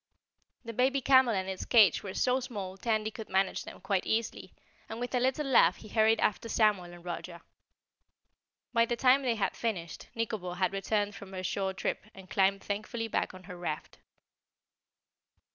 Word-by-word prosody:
The 230 - -6
baby 260 +4 +2
camel 260 -3 +5
and 190 0 -2
its 190 -1 -4
cage 215 -8 +5
were 195 -2 -7
so 255 0 +2
small 205 -7 -6
Tandy 215 +1 -1
could 220 0 -9
manage 190 0 0
them - - -10
quite 195 -2 -1
easily, 225 0 -2 0.4
and 225 - -6
with 245 +1 -4
a 250 - +2
little 260 +4 0
laugh 265 -2 +5
he 215 - -13
hurried 220 +1 +3
after 215 +3 0
Samuel 210 -6 +2
and 175 0 -13
Roger. 170 0 -6 1.3
By 230 -1 +4
the 240 - 0
time 255 +3 +4
they 245 -4 0
had 210 - -1
finished 185 -8 -4
Nikobo 220 -6 -3
had 185 +1 0
returned 205 +1 -1
from 200 -1 -11
her 185 0 -5
shore 190 0 -2
trip - - -3
and 190 -1 -13
climbed 195 0 +2
thankfully 215 +3 -3
back 185 - -1
on 185 - -12
her 180 -1 -9
raft. 175 -3 -5
210 Hz, 180 wpm, -30 LUFS, 190-230 Hz, 1.3 s, camel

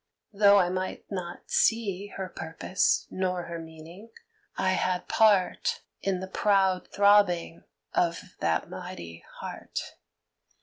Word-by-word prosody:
Though 200 0 +6
I 180 -3 +3
might 185 +1 -3
not 175 -3 -6
see 205 -4 +1
Her 190 -1 -3
purpose 165 +3 0
nor 185 -1 -1
her 170 0 -6
meaning, 165 +6 -11 0.5
I 185 - +2
had 185 -1 0
part 205 -5 +2 0.2
In 190 -2 -1
the 190 - -5
proud 190 -1 +2
throbbing 200 -5 +3 0.3
of 170 -1 +1 0.2
that 80 -1 0
mighty 85 -1 -8 0.2
heart. - - -5
185 Hz, 120 wpm, -28 LUFS, 170-200 Hz, 0.5 s, Though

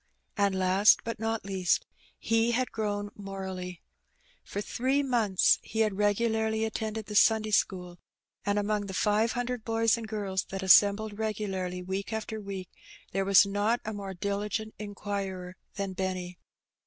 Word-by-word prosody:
And 200 -2 +2
last^ 190 +2 +5
but 230 -1 -4
not 225 0 -1
leasts 190 -2 +1 0.3
he 225 +1 +1
had 255 +1 0
grown 205 -2 -2
morally. 190 -3 -6 0.6
For - - -5
three 260 +6 0
months 225 -8 +3
he 220 - -2
had 215 -3 +1
regularly 220 +2 +1
attended 220 0 -3
the 210 - -7
Sunday 215 +1 +4
school^ 180 -4 0 0.5
and 205 0 0
among 205 0 0
the 190 - -5
five 215 +3 +2
hundred 245 -1 -3
boys 225 0 +2
and 225 -1 -6
girls 200 -3 -2
that 195 0 -5
assembled 205 +3 +5
regularly 190 -4 -3
week 190 +3 -4
after 220 0 -4
week 195 -2 -7 0.4
there 195 +1 0
was 195 0 +7
not 205 +4 +1
a 220 - -3
more 195 -2 -6
diligent 205 +3 -2
inquirer 195 -3 -5 0.2
than 195 -2 -3
Benny. 185 -1 -4
205 Hz, 150 wpm, -29 LUFS, 190-220 Hz, 0.6 s, was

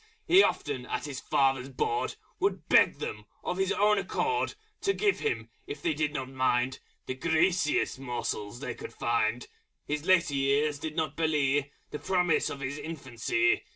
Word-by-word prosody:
He 370 +2 +8
often, 135 - 0
at - - -3
his 140 -3 -5
Father's 135 -1 +1
Board, 425 - -1 0.2
Would 395 - 0
beg - - +5
them, - - -5 0.2
of 180 - -2
his 190 0 +1
own 210 0 +3
accord, 425 - -1 0.3
To 390 - +2
give 415 0 +1
him, 440 - -2 0.2
if 420 +1 -5
they 340 -3 +2
did 150 - 0
not 135 -3 -4
mind, 130 -1 +1 0.3
The - - -3
Greasiest 160 +1 +1
Morsels 120 -3 -4
they 125 - -3
could - - -9
find 115 0 0 0.4
His 150 0 -2
Later 180 -4 +3
Years 140 +2 +1
did 155 0 -5
not 155 -3 -1
belie 145 -3 +1 0.2
The 150 - -4
Promise 180 -4 +2
of 140 - -6
his 135 +2 -3
Infancy. 165 - 0
150 Hz, 165 wpm, -29 LUFS, 135-185 Hz, 0.4 s, He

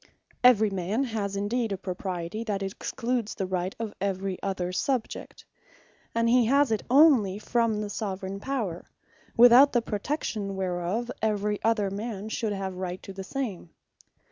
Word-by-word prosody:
Every 220 -4 +6
man 195 +7 -1
has 215 -5 -3
indeed 220 +3 -1
a 195 - -1
Propriety 185 +1 -4
that 200 -3 -2
excludes 230 +3 -3
the 195 - -2
Right 185 0 -2
of 225 -2 -4
every 195 -1 -2
other 185 -2 -2
Subject: 250 +5 -3 0.7
And 230 0 +2
he 240 -1 +4
has 280 0 +4
it 220 - +1
onely 255 -9 +5
from 225 -1 0
the 210 - -4
Soveraign 195 -2 -4
Power; 215 -9 -3 0.5
without 245 +4 +8
the 240 - +3
protection 210 -3 -3
whereof, 190 +5 -2
every 210 -1 0
other 215 -3 +1
man 210 0 -5
should 220 -1 -2
have 195 -1 -3
equall 180 - -8
Right 180 0 -4
to 195 - -8
the 195 0 -6
same. 210 -6 -4
205 Hz, 155 wpm, -27 LUFS, 190-235 Hz, 0.7 s, without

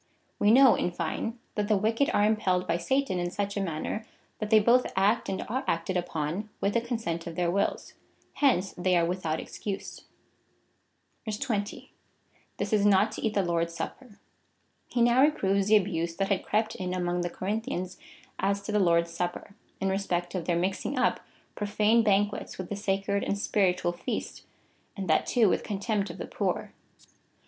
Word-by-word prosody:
We 205 - +4
know, 260 +2 +8
in - - 0
fine, 175 +7 -3 0.2
that 210 -1 -1
the 210 -1 +3
wicked 225 +7 +1
are 205 - +3
impelled 190 -4 +1
by 170 - +1
Satan 265 +2 0
in 175 0 -1
such 200 +2 -3
a 200 - -1
manner, 180 +4 -3 0.4
that 215 - -3
they 220 - +7
both 240 +4 +3
act 200 +4 +2
and 190 - -2
are 260 +5 -2
acted 170 +3 -1
ujjon 175 +2 -2
with 200 - 0
the 235 - +2
consent 225 -9 -3
of 165 - -6
their 175 0 +1
wills.^ 200 +2 -1 0.4
Hence 220 -10 +2
they 180 0 +2
are 170 - +3
with 180 0 -3
out 155 0 0
excuse. 200 -2 -6 1.3
20. 210 -1 -3 0.6
This - - -2
is 210 -1 +3
not 205 +1 +4
to - - -6
eat 220 -1 0
the 200 - +3
Lord's 170 -1 -1
supper. 250 -6 -7 0.7
He 240 - +1
now 240 +2 +5
reproves 200 -10 +2
the 215 0 +7
abuse 170 -4 -1
that 195 +2 -1
had 200 -2 +1
crept 215 +1 0
in 185 0 -3
among 175 -1 -1
the 175 - -1
Corinthians 190 -1 -3 0.4
as 200 +1 0
to - - -4
the 210 - +2
Lord's 170 -2 +3
Supper, 175 +3 -4 0.2
in 195 - 0
respect 180 -3 -1
of 180 -4 -3
their 170 -1 +1
mixing 190 +9 -1
up - - +2 0.3
profane 210 +2 +2
banquets 205 -1 +1
with 185 -2 -6
the 205 - -2
sacred 200 0 -1
and - - 0
si)iritual 185 -3 +1
feast, - - -4 0.5
and 195 -1 -4
that 155 - +2
too 235 -4 +4
with - - +2
contemj)t 205 0 -1
of - - -8
the - - -5
poor. - - -2
200 Hz, 180 wpm, -28 LUFS, 180-215 Hz, 1.3 s, know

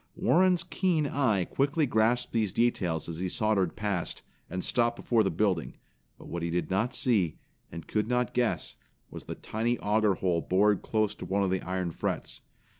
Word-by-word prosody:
Warren's 180 -1 +3
keen 175 -3 0
eye 115 -10 +1
quickly 145 - +1
grasped 120 0 +1
these 110 -5 +1
details 90 -9 0
as 85 -1 -6
he 90 0 -1
sauntered 100 -4 +1
past, 100 -5 -3 0.3
and 90 +1 -4
stopped 120 -1 +1
before 115 -2 +2
'the 95 - +1
building, 90 -2 0 0.4
but - - -13
what 85 - -4
he 85 - -2
did 90 +2 -2
not 110 +6 0
see, 100 -11 +1 0.3
and 85 -1 -7
could 105 0 0
not 125 0 0
guess, 120 -2 -1 0.3
was - - -9
the - - -5
tiny 115 +3 -1
auger 105 -1 +2
hole 90 -3 0
bored 100 +3 +2
close 110 -2 0
to - - -8
one 100 +1 0
of 95 - 0
the 95 - 0
iron 90 -2 -2
frets. - - -4
105 Hz, 185 wpm, -29 LUFS, 90-120 Hz, 0.4 s, Warren's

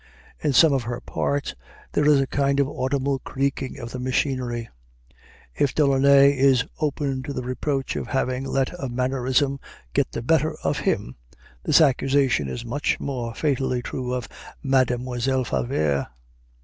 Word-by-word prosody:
In 150 - 0
some 150 +3 +6
of 135 - +1
her 120 +1 -4
parts 140 +2 -2 0.4
there 150 - +2
is 150 -2 +6
a 135 - +2
kind 140 +1 0
of 140 - +3
audible 135 0 -1
creaking 135 -1 -3
of 120 -3 -7
the 130 - -5
machinery. 125 -2 -1 0.9
If 140 - 0
Delaunay 140 -1 +5
is 130 -2 +4
open 140 -3 -1
to 140 +2 -6
the 125 - -4
reproach 135 +2 -2
of - - -4
having 130 -1 -1
let 135 -1 0
a 135 - -2
mannerism 130 +2 0 0.3
get - - +1
the - - -5
better 155 +3 +2
of - - 0
him, 60 - -1 0.4
this - - +4
accusation 135 - +2
is 115 - -5
much 140 +5 -1
more 120 -4 -4
fatally 130 -4 0
true 125 0 -4
of 125 -2 -3 0.4
Mademoiselle 130 -1 +1
Favart. 70 - -1
130 Hz, 150 wpm, -24 LUFS, 125-140 Hz, 0.9 s, some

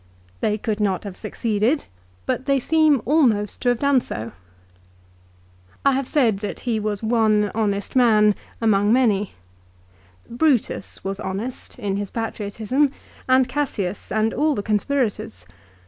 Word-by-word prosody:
They 210 0 0
could 215 0 -3
not 195 -3 0
have 200 -3 -7
succeeded, 220 +6 -1 0.4
but 260 - -2
they 275 -1 +3
seem 310 -2 +3
almost 235 -8 +2
to 245 - +2
have 245 - +2
done 280 0 +3
so. 115 - -6 1.5
I 275 - +6
have 270 -1 -1
said 230 -9 +2
that 205 - -5
he 235 -3 -1
was 210 0 -3
one 215 -3 +2
honest 205 -1 -1
man 215 -4 +5 0.3
among 205 -2 +3
many. 215 -5 +2 0.9
Brutus 245 -5 0
was 195 0 -4
honest 210 +6 -5
in 200 -5 -2
his 200 -1 -4
patriotism, 225 +5 -1 0.4
and 260 0 +5
Cassius, 240 -9 -3
and 220 +1 +1
all 300 0 +1
the 205 - -3
conspirators. 210 - -1
220 Hz, 135 wpm, -22 LUFS, 205-260 Hz, 1.5 s, I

